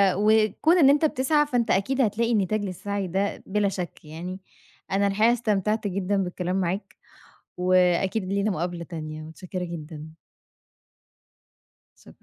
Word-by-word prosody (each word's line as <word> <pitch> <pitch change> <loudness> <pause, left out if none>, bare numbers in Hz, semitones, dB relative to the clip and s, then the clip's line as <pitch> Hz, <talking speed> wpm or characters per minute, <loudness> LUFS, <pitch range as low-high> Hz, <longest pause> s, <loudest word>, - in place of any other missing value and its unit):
وكون 215 - +3
إن 285 -6 +6
أنت 290 +3 +4
بتسعى 295 +1 +2
فأنت 245 -5 0
أكيد 265 +8 +1
هتلاقي 230 +1 +1
نتايج 210 +1 0
للسعي 200 +1 -3
ده 195 +3 -2
بلا 205 +1 +1
شك 180 -4 -6
يعني، 175 +5 -7 0.5
أنا 200 +1 +2
الحقيقة 215 +4 +3
استمتعت 215 -2 0
جدًا 200 +1 -1
بالكلام 180 0 -3
معاك، 185 +4 -3 0.6
وأكيد 185 +2 +2
لينا 200 +3 0
مقابلة 175 -1 -3
تانية 155 -2 -7
متشكرة 180 +3 -6
جدًا. 160 -3 -7 1.9
شكرًا. - - -15
195 Hz, 130 wpm, -25 LUFS, 180-215 Hz, 1.9 s, إن